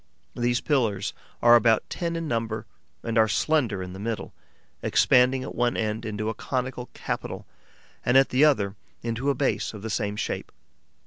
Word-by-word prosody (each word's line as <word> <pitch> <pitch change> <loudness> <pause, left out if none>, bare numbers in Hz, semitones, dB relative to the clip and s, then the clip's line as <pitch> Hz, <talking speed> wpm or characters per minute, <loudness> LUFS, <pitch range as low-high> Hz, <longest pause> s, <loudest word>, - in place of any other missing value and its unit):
These 120 0 +1
pillars 115 -10 0 0.3
are 120 0 +8
about 115 -2 +4
ten 170 -1 -3
in 165 -1 -3
number 115 -3 -2 0.4
and 115 -1 +1
are 110 - +5
slender 115 -5 +1
in 90 0 -7
the 95 - -8
middle, 110 +1 -4 0.5
expanding 130 +1 +4
at - - -6
one 120 0 +1
end 110 0 -2
into 110 0 -3
a 110 - 0
conical 125 +1 -3
capital - - -4 0.6
and 125 +2 +4
at 135 - +5
the 130 +3 +3
other 105 -10 +3 0.3
into 120 +4 -1
a 140 - +2
base 135 -5 -1
of 105 - -9
the 110 - -3
same 105 0 -1
shape. - - -3
115 Hz, 175 wpm, -26 LUFS, 110-130 Hz, 0.6 s, are